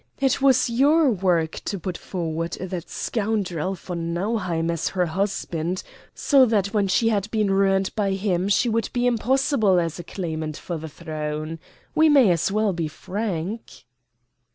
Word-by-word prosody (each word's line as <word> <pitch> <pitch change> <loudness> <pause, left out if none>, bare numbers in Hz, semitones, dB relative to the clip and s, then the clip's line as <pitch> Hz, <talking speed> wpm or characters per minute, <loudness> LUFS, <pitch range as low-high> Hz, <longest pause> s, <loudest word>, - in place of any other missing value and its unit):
It 270 -1 +1
was 265 -2 +4
your 280 +5 +4
work 175 -5 0
to 200 - -2
put 180 0 -4
forward 165 -2 -4
that 180 -2 -5
scoundrel 195 -5 -2
von 170 -2 -4
Nauheim 180 -4 -1
as 165 -1 -2
her 180 -2 0
husband, 180 -1 -2 0.3
so 275 -3 +4
that 205 -2 0
when 205 -2 +2
she 210 +5 +2
had 210 -1 0
been 215 -3 +1
ruined 195 0 +2
by 200 -2 +1
him 190 -1 0
she 225 +4 +3
would 230 -1 0
be 245 0 0
impossible 245 -4 +2
as 165 0 -2
a - - -5
claimant 160 -4 -4
for 175 - -5
the 160 +1 -7
throne. 155 0 -5 0.3
We 315 0 +5
may 270 -10 +6
as 170 +2 +1
well 210 -1 +1
be 165 -2 -2
frank." 190 - -5
190 Hz, 160 wpm, -23 LUFS, 170-220 Hz, 0.3 s, may